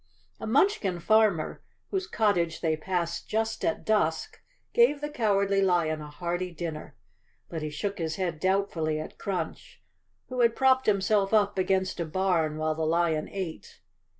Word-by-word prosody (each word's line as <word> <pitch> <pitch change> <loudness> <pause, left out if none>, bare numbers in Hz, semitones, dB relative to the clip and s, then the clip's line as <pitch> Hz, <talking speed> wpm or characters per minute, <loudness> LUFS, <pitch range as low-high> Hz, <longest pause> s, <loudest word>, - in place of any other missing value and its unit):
A - - -5
Munchkin 225 - +2
farmer, 210 -4 +2 0.3
whose 380 -2 -1
cottage 180 - +1
they 160 -2 +1
passed 170 +1 -3
just 220 +1 -1
at 215 -1 -1
dusk, 215 - 0 0.3
gave 470 -12 +4
the 295 +1 -4
Cowardly 200 -5 +2
Lion 170 -5 +1
a 150 - -8
hearty 175 +4 -3
dinner, 160 -4 -6 0.5
but 165 -2 -4
he 155 - -3
shook 200 +7 -4
his 160 -1 -2
head 175 -5 -2
doubtfully 180 -4 0
at 155 - -8
Crunch, 195 -2 -4 0.5
who 255 -1 -4
had 235 -1 +4
propped 260 -1 +3
himself 200 0 +2
up 205 -2 +2
against 190 0 0
a 170 - -1
bam 165 -2 0
while 155 0 0
the 160 - -5
lion 160 -1 +1
ate. 185 -5 -6
185 Hz, 155 wpm, -28 LUFS, 160-215 Hz, 0.5 s, gave